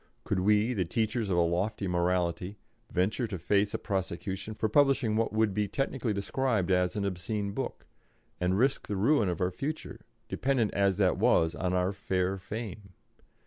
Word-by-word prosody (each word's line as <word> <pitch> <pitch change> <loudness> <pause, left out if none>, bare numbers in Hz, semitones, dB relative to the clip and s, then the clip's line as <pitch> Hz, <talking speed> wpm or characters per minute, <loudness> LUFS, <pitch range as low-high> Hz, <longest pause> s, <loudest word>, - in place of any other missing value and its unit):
Could 100 - -1
we, 105 +5 +3
the 100 -6 0
teachers 110 +4 -1
of 90 - +1
a - - +5
lofty 90 +4 0
morality, 90 +2 0 0.3
venture 100 +7 0
to 100 -3 -4
face 100 +4 +1
a - - +1
prosecution 95 +1 -3
for 110 - 0
publishing 135 -2 +3
what 115 +1 +1
would 110 -1 +2
be 105 +1 0
technically 135 0 -1
described 105 -1 0
as 90 -1 +2
an 100 -1 -1
obscene 100 +2 -2
book, - - -5 0.5
and 90 +1 +1
risk 130 +5 +1
the 105 - -2
ruin 110 0 +3
of 90 - -2
our 90 -1 +1
future, 135 - -5 0.3
dependent 130 -5 0
as 100 -1 +2
that 95 -2 +2
was 85 -7 +3
on 90 0 -1
our 90 +2 +1
fair 95 -1 -1
fame? 100 0 -7
100 Hz, 175 wpm, -29 LUFS, 90-110 Hz, 0.5 s, a